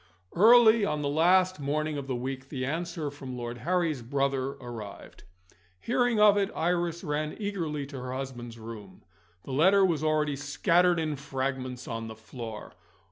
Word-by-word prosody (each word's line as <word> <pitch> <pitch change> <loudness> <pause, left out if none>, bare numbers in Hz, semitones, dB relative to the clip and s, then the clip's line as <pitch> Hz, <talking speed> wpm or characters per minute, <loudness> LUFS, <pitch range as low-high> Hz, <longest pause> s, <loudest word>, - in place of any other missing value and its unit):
Early 225 +2 +7
on 150 -7 -1
the 140 - 0
last 180 +4 +3
morning 150 +2 -1
of 140 -2 -5
the 130 - -2
week 130 +2 -5
the 130 -3 -3
answer 165 0 -3
from 135 -3 -8
Lord 120 0 -5
Harry's 170 -5 0
brother 135 +2 -1
arrived. 115 -9 -10 0.5
Hearing 245 - +1
of 210 -1 +6
it, 200 -1 +1
Iris 170 +1 -1
ran 150 -1 -2
eagerly 170 -8 -3
into 135 -2 -8
her 125 0 -5
husband's 120 -3 -6
room. 110 -2 -10 0.4
The - - -8
letter 190 +7 +5
was 160 -5 0
already 155 -2 +1
scattered 170 +5 +2
in 155 -2 -2
fragments 130 -2 -4
on 115 -1 -4
the 110 - -8
floor. 110 0 -8
145 Hz, 160 wpm, -28 LUFS, 130-175 Hz, 0.5 s, Early